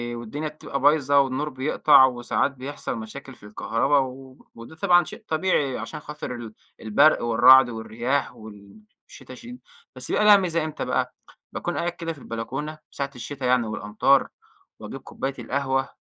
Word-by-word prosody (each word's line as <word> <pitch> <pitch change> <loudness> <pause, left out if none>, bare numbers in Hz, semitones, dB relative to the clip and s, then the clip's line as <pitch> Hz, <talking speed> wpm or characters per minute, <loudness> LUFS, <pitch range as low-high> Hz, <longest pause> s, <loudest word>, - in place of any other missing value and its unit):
والدنيا 130 +7 -5
بتبقى 145 -2 -6
بايظة 145 0 +4
والنور 135 +3 0
بيقطع 130 0 +4
وساعات 125 +2 -1
بيحصل 135 0 -6
مشاكل 130 +4 -9
في 105 - -17
الكهربا 115 +7 0
و 130 0 -6 0.2
وده 115 +7 -12
طبعًا 175 +1 +4
شيء - - -11
طبيعي 155 -5 0
علشان 115 +6 -7
خاطر 150 -4 -7
ال 115 -2 -9 0.3
البرق 140 +8 +3
والرعد 120 +2 +6
والرياح 120 +4 -3
وال 110 - -14 0.3
الشتا - - -12
شي 245 0 -11 0.4
بس - - -8
يبقى 210 - +1
لها 210 -1 +8
ميزة 170 -4 -1
إمتى 155 - -5
بقى؟ - - -1 0.4
باكون - - -4
قاعد 175 0 -1
كده 165 -1 -5
في 145 - -15
البلكونة 135 +7 -6
ساعة 140 0 -4
الشتا 130 +2 -6
يعني 125 -2 +2
والأمطار 110 +6 +1 0.5
وأجيب - - -8
كوباية 135 0 -5
القهوة 135 +2 -1
135 Hz, 155 wpm, -24 LUFS, 120-150 Hz, 0.5 s, لها